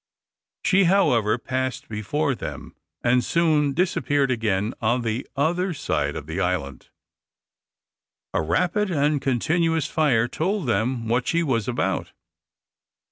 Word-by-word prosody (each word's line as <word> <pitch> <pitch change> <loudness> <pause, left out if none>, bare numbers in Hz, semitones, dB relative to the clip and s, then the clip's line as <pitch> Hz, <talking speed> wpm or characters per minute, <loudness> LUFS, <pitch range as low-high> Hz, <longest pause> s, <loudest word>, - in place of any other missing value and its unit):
She, 195 0 +4
however, 125 - +3
passed 130 +1 -3
before 140 +8 -1
them, - - -7 0.3
and 125 +1 +3
soon 155 -1 +2
disappeared 145 -6 +1
again 110 -2 0
on 120 +2 +1
the 115 +3 -2
other 175 +5 0
side 75 - -1
of 70 - -6
the 80 +4 -4
island. 85 -8 -2 1.4
A - - +1
rapid 180 - 0
and 145 -3 +1
continuous 160 +5 +1
fire 125 -7 +2
told 180 - -2
them 115 +1 0
what 120 +2 0
she 170 0 +2
was 115 -8 0
about. 125 - -2
130 Hz, 125 wpm, -24 LUFS, 115-160 Hz, 1.4 s, She